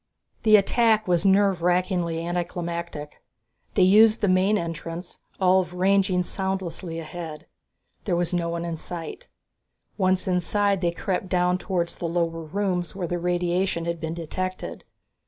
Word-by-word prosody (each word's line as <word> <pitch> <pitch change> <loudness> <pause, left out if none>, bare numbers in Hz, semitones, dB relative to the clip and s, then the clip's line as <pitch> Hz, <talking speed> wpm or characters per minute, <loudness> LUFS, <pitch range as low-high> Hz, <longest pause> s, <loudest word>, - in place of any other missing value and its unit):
The 215 -2 +6
attack 220 +1 +3
was 175 0 +2
nerve 195 -1 +4
rackingly 175 -2 0
anticlimactic. 170 -3 -4 0.5
They 190 - +5
used 215 +4 +6
the 205 - +2
main 190 +3 +3
entrance, 165 0 -6 0.2
Ulv 185 -1 +3
ranging 190 0 +2
soundlessly 185 -3 -3
ahead. 160 -1 -7 0.6
There 185 - +1
was 175 0 0
no 170 -1 0
one 170 0 -3
in 165 -1 -3
sight. 165 -2 -7 0.7
Once 185 -1 +2
inside, 195 +2 +1
they 175 - +2
crept 185 +2 -3
down 180 0 +2
towards 175 -3 -2
the 170 - -3
lower 165 -1 -1
rooms 180 +1 -2
where 185 -3 -3
the 175 +1 -2
radiation 175 0 0
had 170 -1 -3
been 160 0 -3
detected. 185 +3 -5
180 Hz, 140 wpm, -25 LUFS, 170-190 Hz, 0.7 s, The